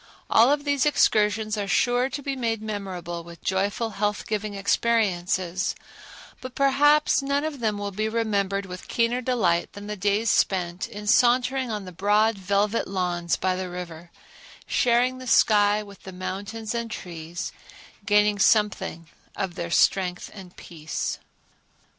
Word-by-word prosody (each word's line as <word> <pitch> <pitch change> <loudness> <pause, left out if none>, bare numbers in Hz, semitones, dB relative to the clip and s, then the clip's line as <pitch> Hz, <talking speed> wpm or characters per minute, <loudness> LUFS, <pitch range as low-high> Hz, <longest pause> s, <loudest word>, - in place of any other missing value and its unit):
All 230 +3 +6
of 290 0 +1
these 285 -1 +1
excursions 215 -5 +2
are 200 - -2
sure 245 +5 +2
to 285 +2 -6
be 275 0 -2
made 230 -3 -1
memorable 185 -5 -5
with 170 -1 -13
joyful 200 +4 -1
health 205 +1 -2
giving 210 -1 -3
experiences; 190 -4 0 0.7
but 255 -1 -8
perhaps 290 +2 +4
none 280 +1 0
of 310 -3 -4
them 215 -3 0
will 205 0 -4
be 215 +3 -2
remembered 200 -3 -1
with 180 -1 -9
keener 235 +1 0
delight 205 -9 0
than 200 0 -9
the 210 0 -4
days 205 +3 +1
spent 180 -1 0
in 205 0 -9
sauntering 250 +3 +3
on 210 -3 -4
the 185 - -8
broad 210 +5 +2
velvet 200 +3 0
lawns 175 -3 -1
by 185 0 0
the 185 0 -4
river, 175 -2 -8 0.6
sharing 250 +2 +2
the 255 - -9
sky 210 -2 +4
with 200 -1 -14
the 190 - -9
mountains 205 +4 -5
and 235 -1 -3
trees, 170 -4 -6 0.5
gaining 210 0 +3
something 200 -5 +1 0.3
of 190 -2 -3
their 170 0 -5
strength 180 +1 +1
and 185 -3 -12
peace. 155 -2 -5
205 Hz, 150 wpm, -25 LUFS, 185-230 Hz, 0.7 s, All